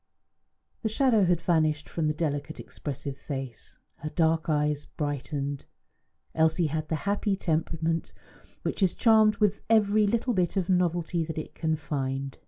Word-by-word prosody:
The 220 - 0
shadow 225 -3 +3
had 175 -1 +2
vanished 155 -3 +1
from 160 -2 -1
the 150 - +1
delicate 150 -1 -2
expressive 140 -1 -6
face; 135 -5 -6 0.3
the 155 - -2
dark 165 0 +1
eyes 150 -1 +1
had - - -28
brightened. 145 -1 -3 0.7
Elsie 160 +2 +3
had 155 -1 -2
the 160 - -1
happy 200 0 +1
temperament 165 -1 -1 0.5
which - - -2
is 185 -3 +3
charmed 220 -2 +5
with 210 -2 +1
every 215 -1 +4
little 235 +3 +1
bit 180 -1 0
of 185 -2 0
novelty 175 -2 +1
that 160 0 -6
it 155 - -5
can 160 -1 0
find. 135 -3 -3
160 Hz, 155 wpm, -28 LUFS, 150-190 Hz, 0.7 s, charmed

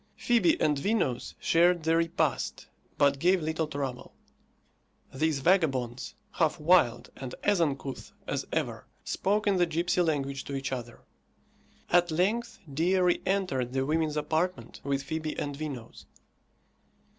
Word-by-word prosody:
Fibi 230 -8 +3
and 150 -2 +2
Vinos 180 - -1
shared 175 0 +3
the 160 +1 +3
repast, 165 0 0 0.3
but 140 -1 +3
gave 180 +4 +4
little 160 0 -1
trouble. 135 -4 -5 1.0
These 150 0 0
vagabonds, 135 -8 +1 0.2
half 160 -2 +1
wild 150 -7 +3
and 130 -2 -7
as 205 -4 +3
uncouth 140 -4 -2
as - - -3
ever, - - -2 0.2
spoke 210 +2 0
in 200 -2 +3
the 175 -1 +3
gipsy 170 +2 +1
language 140 -5 -1
to 140 - -5
each 135 0 -3
other. 120 -2 -6 0.9
At 175 0 +4
length 205 +9 0 0.2
Dea 175 +6 +2
re 180 -1 +3
entered 180 -11 0
the 135 0 0
women's 155 0 0
apartment 165 +4 -2
with 140 -1 -1
Fibi 155 +1 -4
and 145 -1 -3
Vinos. 140 -6 -7
155 Hz, 135 wpm, -29 LUFS, 135-180 Hz, 1.0 s, gave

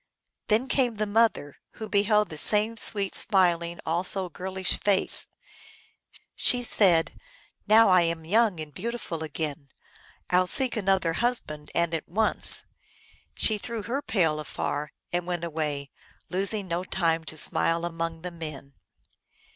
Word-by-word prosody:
Then 225 +4 +1
came 250 -4 0
the 215 0 -2
mother, 205 -9 0 0.2
who 220 - -8
beheld 210 0 +2
the 155 - -8
same 215 +5 +4
sweet, 200 -3 +4
smiling, 170 -3 +2
also 180 +3 -1
girlish 185 +2 -3
face. 200 -2 +3 1.1
She, 245 0 +3
said, 180 -8 +3 0.3
" - - -29 0.2
Now 220 +1 +6
I 185 -1 +5
am 165 -1 -2
young 210 0 +2
and 155 -1 -7
beautiful 210 - -5
again; 155 -2 -5 0.6
I 180 - +2
11 185 0 +2
seek 255 +6 +2
another 190 -5 0
husband, 165 -10 -3
and 170 -1 0
at 160 - -4
once." 215 +5 +3 0.7
She 215 -2 +2
threw 230 0 -5
her 265 +6 -3
pail 180 - 0
afar 150 0 -4 0.2
and 175 0 -2
went 175 -1 -3
away, 150 -4 -4 0.4
losing 195 +2 -2
no 175 +1 -3
time 165 -3 -1
to 155 - -9
smile 165 +2 +1
among 165 -1 -5
the 180 - -5
men. 155 -5 -9
180 Hz, 145 wpm, -26 LUFS, 165-210 Hz, 1.1 s, Now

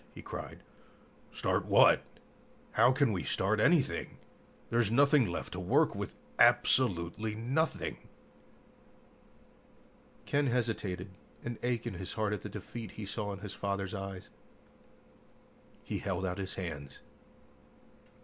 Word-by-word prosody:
he - - -8
cried. - - -7 0.7
"Start - - 0
what? - - +6 0.7
How 120 +3 +5
can 135 -2 +3
we 95 -4 -1
start 95 +8 +1
anything? 150 +4 +2 0.5
There's 115 -3 +3
nothing 140 +1 +5
left 85 - -4
to - - -4
work - - +3
with, - - -5 0.2
absolutely 105 -2 +3
nothing!" 130 +9 -1 2.3
Ken 145 0 +1
hesitated, 105 -6 -1 0.3
an 120 -1 -4
ache 120 -1 -1
in 120 - -3
his 95 0 -6
heart 105 -1 0
at 105 - -3
the - - -6
defeat 115 -1 -7
he 105 - -6
saw 100 +1 -3
in 100 0 -7
his 105 -1 -6
father's 100 0 -3
eyes. 95 -2 -6 1.5
He - - -3
held 95 -1 -2
out 90 +1 -3
his 95 -1 -4
hands. 80 -7 -6
105 Hz, 125 wpm, -32 LUFS, 95-120 Hz, 2.3 s, what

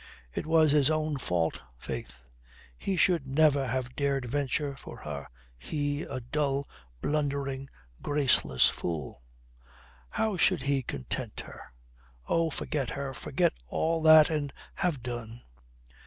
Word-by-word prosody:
It - - -3
was 160 -2 +5
his 145 -1 +4
own 155 -1 0
fault, 85 -7 0 0.2
faith. - - -6 0.5
He 190 - -2
should 170 -5 +3
never 140 -1 +3
have 125 +1 -2
dared 140 -2 0
venture 140 +2 -1
for - - -10
her, 70 -2 -6 0.3
he, 145 - -2
a 130 - -4
dull, 140 +2 -1 0.4
blundering, 140 -2 -1 0.3
graceless 135 - +3
fool. 80 -6 -4 0.9
How 215 - 0
should 175 -5 +3
he 140 -1 +1
content 70 - -4
her? 65 - -12 0.6
Oh, 165 -1 +2
forget 140 -3 -2
her, 140 +1 -4
forget - - +1
all 165 - 0
that 155 0 +8
and 145 -3 -1 0.2
have 165 -10 -1
done. 120 -1 -6
140 Hz, 125 wpm, -29 LUFS, 125-155 Hz, 0.9 s, that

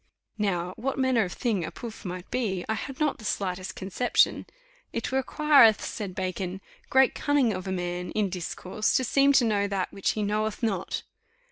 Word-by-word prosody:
Now 180 -3 0
what 270 +3 -2
manner 260 -5 +3
of 180 - -6
thing 220 -8 -1
a 160 - -3
pouf! 230 -2 -9
might 180 0 -6
be, 195 -8 -1
I 220 - 0
had 260 +5 -6
not 300 -2 +1
the - - -12
slightest 185 -2 -3
conception. 200 +6 +1 0.4
"It 230 - -3
requireth," 265 -4 +5
said 195 -4 -5
Bacon, 185 0 -3 0.3
"great 265 -1 +5
cunning 285 -5 +2
for 190 - -6
a - - -1
man 180 -1 -3
in 210 -2 +1
discourse 185 +3 -2
to 260 - +3
seem 275 +3 +4
to 260 -3 +5
know 205 -2 +1
that 195 -2 -2
which 195 - 0
he 215 - -2
knoweth 215 +2 -1
not." 200 -6 -1
210 Hz, 180 wpm, -27 LUFS, 185-250 Hz, 0.4 s, requireth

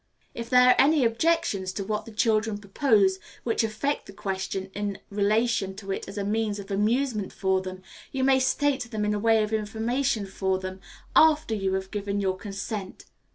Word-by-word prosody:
If 235 0 -6
there 250 0 +6
are - - +7
any 290 -2 +4
objections 230 - +1
to 200 - -3
what 210 +2 -3
the 230 - -10
children 220 -1 +1
propose 200 -2 +2 0.2
which 230 -1 +1
affect 225 +7 -2
the 200 - -10
question 190 0 -4
in 205 -1 -3
relation 210 -1 +1
to 195 -1 -6
it - - -4
as 200 - -8
a 200 - -1
means 210 0 -1
of 200 -1 -8
amusement 215 +1 0
for 190 -1 0
them, 185 0 -8 0.3
you 265 -1 -1
may 265 0 +4
state 265 -1 +1
them 215 -2 -2
in 210 - +1
the 210 - 0
way 225 0 +4
of 215 +1 -4
information 220 +2 -1
for 190 0 -1
them, 185 0 -6 0.4
after 310 -6 +5
you 195 -3 -1
have 190 0 -3
given 205 -1 -2
your 190 -2 0
consent. 195 0 -6
210 Hz, 190 wpm, -26 LUFS, 195-235 Hz, 0.4 s, are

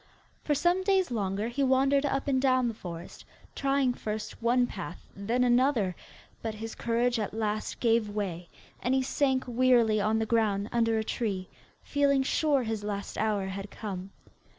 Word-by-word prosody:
For 295 - +1
some 350 +5 +2
days 380 -4 +2
longer 205 -1 -1
he 240 +4 -3
wandered 275 +2 +3
up 275 0 -1
and 260 -2 +2
down 255 -2 +3
the 230 - -2
forest, 175 -5 -9 0.3
trying 275 -2 +1
first 215 -1 -5
one 245 +2 +3
path, 185 -6 -8
then 230 +6 0
another, 240 -6 +2 0.5
but 220 -1 -3
his 225 +1 -6
courage 235 +1 0
at 215 0 -3
last 215 -1 -2
gave 230 -2 +2
way, 185 -5 -4 0.3
and 250 +2 +1
he 265 - +2
sank 265 0 +1
wearily 240 -3 +3
on 215 +2 +2
the 220 - 0
ground 215 -2 +1
under 230 -1 +2
a 220 - 0
tree, 200 -5 -3 0.3
feeling 280 -1 +2
sure 285 -1 +2
his 220 -2 -3
last 200 -1 -4
hour 210 -3 0
had 195 +1 -5
come. 195 -3 -6
230 Hz, 170 wpm, -29 LUFS, 210-260 Hz, 0.5 s, wandered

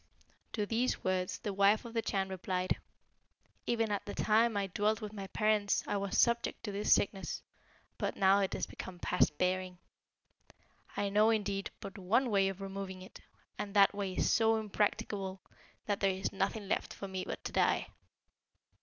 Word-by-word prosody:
To 210 -2 0
these 235 +4 0
words 185 -1 0
the 205 - -4
wife 200 +4 +4
of 230 - -8
the 230 - +1
Chan 195 -3 -1
replied, 185 -1 -1 0.9
'Even 225 -2 +1
at 205 - -1
the 205 - -5
time 220 0 +3
I 200 - +1
dwelt 210 +3 0
with 215 -2 -6
my 195 -2 -6
parents 215 0 +1
I - - -1
was 200 0 -2
subject 235 0 +2
to 210 - -3
this 200 +1 -1
sickness. 195 -1 +1 0.6
But - - -1
now 195 0 +5
it 195 -1 0
is - - -1
become 185 -1 -8
past 175 -4 +1
bearing. 185 0 0 1.2
I 200 - 0
know, 210 +2 +4
indeed, 200 -3 0
but 195 +1 -8
one 230 +7 +2
way 195 -1 +4
of 195 0 -7
removing 195 -1 -6
it; 185 - -13 0.4
and 205 -1 -4
that 200 0 +6
way 200 -2 -3
is - - +1
so 225 0 +4
impracticable, 205 -2 -1 0.5
that 205 -1 -1
there 195 - +3
is 190 +1 -2
nothing 195 +1 -1
left - - -1
for 200 - -6
me 190 -1 -4
but - - -6
to - - -4
die.' - - +2
200 Hz, 180 wpm, -33 LUFS, 190-215 Hz, 1.2 s, that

